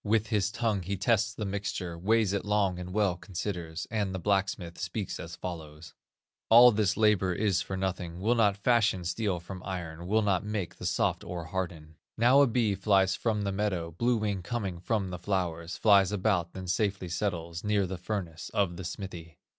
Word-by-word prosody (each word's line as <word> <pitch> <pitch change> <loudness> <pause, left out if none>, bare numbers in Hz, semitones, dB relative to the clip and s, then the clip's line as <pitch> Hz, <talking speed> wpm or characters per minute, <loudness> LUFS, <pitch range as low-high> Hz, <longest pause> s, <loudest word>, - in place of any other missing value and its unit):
With 110 0 +1
his 100 -4 +1
tongue 110 -4 0
he 95 +3 -3
tests 110 +2 +2
the 105 0 -5
mixture, 95 -3 -3
Weighs 105 +3 +2
it 100 - -1
long 100 -3 +1
and 90 0 -6
well 100 -2 +2
considers, 85 -3 -5
And 100 -4 -1
the - - -3
blacksmith 95 -2 -1
speaks 95 +2 -4
as 85 +1 -7
follows: 80 -3 -8 0.6
'All 120 +2 +9
this 105 -2 +1
labor 105 -4 +3
is 100 -2 +1
for 95 - -4
nothing, 90 -2 -3
Will 110 +5 +2
not 105 -4 +3
fashion 105 -4 +2
steel 95 +1 -1
from 90 +2 -8
iron, 85 -3 -5
Will 110 +3 +2
not 100 -3 +1
make 105 -4 -4
the - - -3
soft - - 0
ore 85 -1 -5
harden.' 80 -3 -5 0.2
"Now 125 +5 +6
a 140 - +6
bee 115 -3 +1
flies 95 -1 +3
from 110 -3 -1
the 100 - -1
meadow, 95 -4 -1
Blue 120 +8 +1
wing 105 -3 -1
coming 100 -4 -3
from 95 0 -1
the 90 - -5
flowers, 85 -3 -2
Flies 100 -3 +5
about, 95 -4 0
then 95 -1 -6
safely 95 0 -1
settles 85 -2 -3
Near 105 -2 +2
the 95 0 -5
furnace 90 -4 -4
of 90 -4 +1
the 95 - -6
smithy. 85 -3 -7
95 Hz, 190 wpm, -29 LUFS, 90-105 Hz, 0.6 s, All